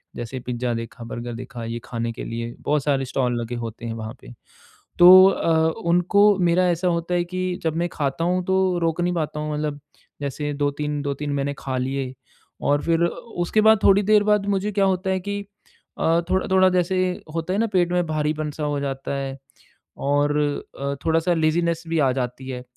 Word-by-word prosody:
जैसे 120 +2 -5
पिज़्ज़ा 125 0 -3
देखा, 115 +1 -6
बर्गर 120 +1 -6
देखा, 120 0 -7
ये 115 +1 -4
खाने 115 -1 -3
के 115 - -7
लिए 115 +1 -5
बहुत 150 -1 +1
सारे 135 -2 +1
स्टॉल 125 -2 -1
लगे 120 +1 -5
होते 115 0 -6
हैं 115 - -3
वहाँ 110 0 -6
पे, - - -12 0.7
तो 185 +2 +10
अ, 160 -3 +2 0.2
उनको 200 +4 +4
मेरा 180 0 +3
ऐसा 175 +2 0
होता 170 0 -1
है 175 0 +1
कि, 185 0 -3
जब 160 -1 -1
मैं 170 +1 0
खाता 140 +2 -2
हूँ 180 +1 +1
तो 190 -1 +1
रोक 165 0 0
नहीं 175 0 +1
पाता 155 -2 -2
हूँ, 150 0 -3
मतलब 150 -1 -3 0.4
जैसे 145 +1 -3
2-3 145 +1 -2
2-3 145 +1 -3
मैंने 140 0 -1
खा 130 -1 -4
लिए 130 0 -3 0.5
और 145 0 +2
फिर 165 0 +1
अ, - - +3
उसके 195 +1 -2
बाद 220 0 +6
थोड़ी 200 +1 +6
देर 210 +1 +4
बाद 210 -1 +2
मुझे 200 +1 0
क्या 200 0 +2
होता 190 0 0
है 190 - 0
कि 205 +2 -4 0.6
अ, 165 +1 +3
थोड़ा-थोड़ा 190 0 +3
जैसे 185 0 +1 0.4
होता 165 +2 -2
है 195 - 0
ना 230 - +2
पेट 175 -2 +2
में 180 0 +2
भारीपन-सा 155 0 -2
हो 145 -1 -1
जाता 135 0 -3
है। 135 -1 -4 0.6
और 145 +1 +1 0.4
अ, 140 0 -2
थोड़ा-सा 165 +2 +2
लेज़ीनेस 165 +1 +1
भी 165 0 0
आ 135 -3 +3
जाती 125 0 -4
है, 125 -1 -5
155 Hz, 195 wpm, -23 LUFS, 135-180 Hz, 0.7 s, तो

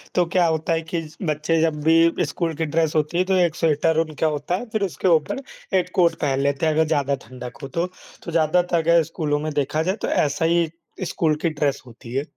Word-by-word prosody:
तो 180 - +3
क्या 175 +1 +2
होता 160 +1 0
है 165 - 0
कि 165 +1 -3
ज 155 -1 -12
बच्चे 155 +2 +1
जब 160 -2 +1
भी 165 +1 +4
स्कूल 165 -2 -2
की 160 - -1
ड्रेस 160 +1 0
होती 155 +3 0
है, 180 - +4
तो 190 - 0
1 175 -3 +2
स्वेटर 160 0 +2
उनका 155 0 -1
होता 150 +3 -1
है 240 - -4
फिर 215 -1 -1
उसके 190 +1 -2
ऊपर 165 - +2 0.4
1 180 0 0
कोट 170 -3 +4
पहन 135 -2 +1
लेते 140 +2 0
हैं 155 - +2
अगर 160 +1 +3
ज़्यादा 140 -3 +1
ठंडक 125 -1 -9
हो - - -4
तो। 170 +4 -1 0.4
तो 170 - -6
ज़्यादातर 170 +2 +2
अगर 165 0 +4
स्कूलो 150 -2 -2
में 155 +1 -3
देखा 145 +2 0
जाए 185 +4 0
तो - - -1
ऐसा 150 +2 +1
ही 170 -1 +2 0.4
स्कूल 155 -2 +1
की 170 - +2
ड्रेस 145 -2 -1
होती 120 0 -12
है। 135 +2 0
160 Hz, 235 wpm, -22 LUFS, 150-170 Hz, 0.4 s, भी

